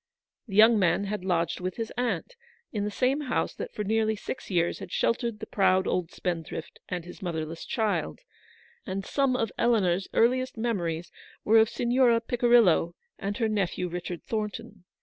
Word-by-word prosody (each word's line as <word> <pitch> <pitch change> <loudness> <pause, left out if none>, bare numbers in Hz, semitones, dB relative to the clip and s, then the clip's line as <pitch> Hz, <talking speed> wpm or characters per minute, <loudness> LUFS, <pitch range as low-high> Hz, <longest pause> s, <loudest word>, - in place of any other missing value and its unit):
The 195 - -6
young 220 +1 +7
man 175 +1 +2
had 205 -1 -3
lodged 170 -3 0
with 180 0 -3
his 225 -2 -4
aunt 250 - -2 0.4
in 205 -2 -2
the - - -1
same 260 +7 +1
house 270 - -1
that - - -6
for 210 - -4
nearly 220 +1 +1
six 215 - -7
years 175 -3 +1
had - - -8
sheltered 230 -2 0
the 220 - -5
proud 190 -3 +2
old 180 -3 -1
spendthrift 165 -2 -5
and 180 -2 -3
his 180 +4 -11
motherless 165 -2 -4
child, 220 -4 -1 0.6
and 195 0 -4
syme 275 -3 +1
of 225 -5 -1
Eleanor's 195 -6 +2
earliest 255 +1 +2
memories 175 -8 -2 0.3
were 225 +1 +6
of 220 0 +4
Signora 240 -1 +3
Picirillo 230 -8 +3 0.2
and 200 +1 -3
her 225 - +1
nephew 195 -4 -1
Richard 175 0 -5
Thornton. 215 -2 -5
210 Hz, 170 wpm, -27 LUFS, 180-230 Hz, 0.6 s, young